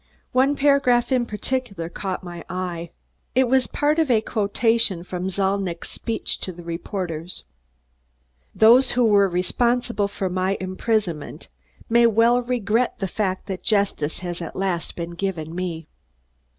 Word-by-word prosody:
One 270 +3 +3
paragraph 275 -4 +3
in 250 -2 +2
particular 210 -5 -3
caught 185 +2 -4
my 175 -1 -8
eye. 175 -2 -4 0.5
It 260 0 +4
was 260 0 +3
part 300 +2 +1
of 315 -4 +2
a 235 -3 +5
quotation 215 -3 +1
from 180 +1 -4
Zalnitch's 190 -2 -1
"speech" 230 -1 -3
to 185 - -4
the 175 0 -11
reporters. 170 0 -4 1.1
"Those 240 +4 +6
who 245 -1 +3
were 200 -3 +5
responsible 235 +4 +1
for 200 -1 -3
my 185 +2 0
imprisonment 185 -4 -2 0.4
may 235 +1 +5
well 230 +2 +4
regret 240 -1 0
the 195 - -2
fact 190 -1 -2
that 190 -2 -5
justice 200 -8 0
has 175 0 -4
at 165 - -6
last 185 -3 -2
been 170 0 -5
given 170 -3 -4
me. 170 -3 -4
200 Hz, 140 wpm, -23 LUFS, 180-235 Hz, 1.1 s, Those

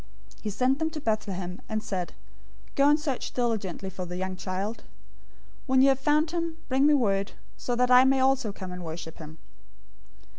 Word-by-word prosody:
002:008 - - -23
He 215 - -3
sent 255 +7 +1
them 320 0 +1
to 315 -1 -6
Bethlehem, 195 -7 -2
and 215 -1 -2
said, 180 -3 -3 0.6
"Go 280 +1 +4
and 300 +1 +4
search 280 -4 -3
diligently 205 -6 -1
for 185 0 -5
the 180 +1 -5
young 185 0 -3
child. 190 +4 -4 0.9
When 260 0 +5
you 275 - +7
have 270 -1 +2
found 300 +3 +2
him, 335 -1 -2
bring 270 +2 +3
me 300 - +6
word, 200 -6 +1 0.2
so 245 - -2
that 250 +1 +2
I 250 0 +9 0.2
also 265 -3 +2
may - - -6
come 185 -2 -5
and 180 0 -6
worship 160 0 -7
him." 155 0 -10
225 Hz, 190 wpm, -27 LUFS, 185-270 Hz, 0.9 s, I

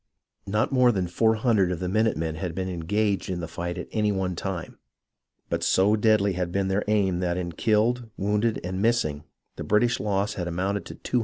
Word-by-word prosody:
Not 105 +6 0
more 125 -2 +5
than 95 -5 -1
400 110 0 +2
of 90 - -3
the 90 - -2
minute 110 +4 +1
men 80 0 -2
had 80 +1 -4
been 95 0 -2
engaged 100 +4 -1
in 90 -2 -2
the 85 - -4
fight 85 +2 -5
at 90 - -5
any 105 -2 +1
one 95 -2 -1
time, 95 -1 -5 0.7
but - - -2
so 100 +3 +4
deadly 105 -2 +3
had 90 -1 -2
been 95 +1 0
their 95 +2 +1
aim 100 -4 +2
that 90 -1 -1
in 85 -1 -3
killed, 115 +5 +1
wounded, 105 +3 0
and 95 +2 -3
missing 105 -11 +1 0.3
the - - -4
British 110 +3 +2
loss 100 0 0
had 90 -3 -4
amounted 95 +4 -2
to - - -8
273. 125 - -1
100 Hz, 205 wpm, -26 LUFS, 90-110 Hz, 0.7 s, more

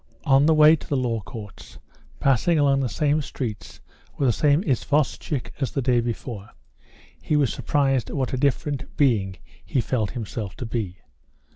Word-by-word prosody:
On 140 0 +4
the 160 - +5
way 155 +1 +7
to - - -11
the 140 - 0
Law 120 -3 -1
Courts, 105 -1 -10 0.4
passing 140 +5 +2
along 140 -2 +3
the 130 -3 -1
same 150 +7 +1
streets 105 - -6 0.4
with 140 - +1
the 120 - +3
same 150 - +2
isvostchik 145 - -1
as 135 - +1
the 135 - -2
day 125 -1 +3
before, 115 -3 -5 0.7
he 150 - 0
was 145 -4 +2
surprised 135 -4 0
what 135 -4 -2
a - - 0
different 140 +1 -1
being 105 -10 +2 0.3
he 135 - -1
felt 115 -4 -1
himself 110 -5 -5
to 125 - -6
be. 110 -6 -3
130 Hz, 165 wpm, -24 LUFS, 115-145 Hz, 0.7 s, way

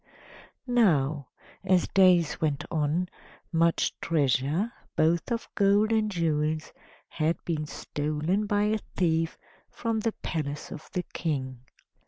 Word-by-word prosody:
Now, 155 - +2 0.4
as 185 -2 +3
days 180 -4 +4
went 150 -3 0
on, 160 +3 0 0.4
much 165 0 +2
treasure, 150 - +1 0.2
both 165 +4 +2
of 235 0 -2
gold 205 +2 +3
and 220 -1 +2
jewels, 155 -4 -1 0.3
had 160 +1 0
been 155 -3 -2
stolen 155 +9 -2
by 205 0 +2
a 215 +1 +1 0.2
thief 165 -2 +1 0.3
from 230 -2 -2
the 220 0 -1
palace 150 -2 -3
of 155 - -9
the 180 - -1
King. 130 -6 -2
165 Hz, 120 wpm, -28 LUFS, 150-200 Hz, 0.4 s, days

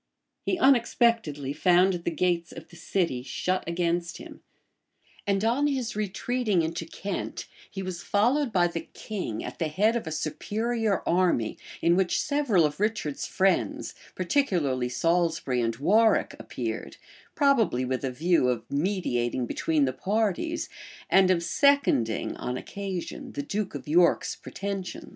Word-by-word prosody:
[] - - -53
He 370 - +1
unexpectedly 230 - +2
found 180 +4 +4
the - - +2
gates 170 +1 0
of - - -11
the 175 - -15
city 170 -6 -1
shut 180 +8 -2
against 170 0 -1
him; - - -11 0.9
and 200 +1 +1
on 260 +6 +2
his 255 -6 -2
retreating 210 -1 0
into 165 +1 -3
Kent, 200 +1 -5 0.2
he 195 - -6
was 185 -2 -5
followed 245 +6 +2
by 180 -4 +3
the 170 -1 -2
king 190 - -4
at - - -7
the 165 - 0
head 210 +9 +2
of 235 - -3
a - - -3
superior 215 +7 -1
army; 170 -11 +2 0.3
in 170 +1 +4
which 185 -1 +1
several 280 - +2
of 150 +2 -2
Richard's 210 -9 -1
friends, 190 -2 0 0.2
particularly 170 - +1
Salisbury 165 -2 +1
and 115 -1 0
Warwick 210 - +3
appeared; - - -5 0.4
probably 245 - +3
with 130 +1 -2
a 135 - 0
view 155 0 +2
of 120 -3 -1
mediating 140 -8 0
between 150 +4 +1
the 130 - -1
parties, 225 - -1 0.4
and 190 -1 +6
of 175 -2 +2
seconding, 280 - +2
on 125 +1 -3
occasion, 195 +2 -6
the 145 - -3
duke 200 +6 -3
of - - -7
York's 170 +3 +3
pretensions. 195 -2 -6
180 Hz, 145 wpm, -27 LUFS, 155-215 Hz, 0.9 s, and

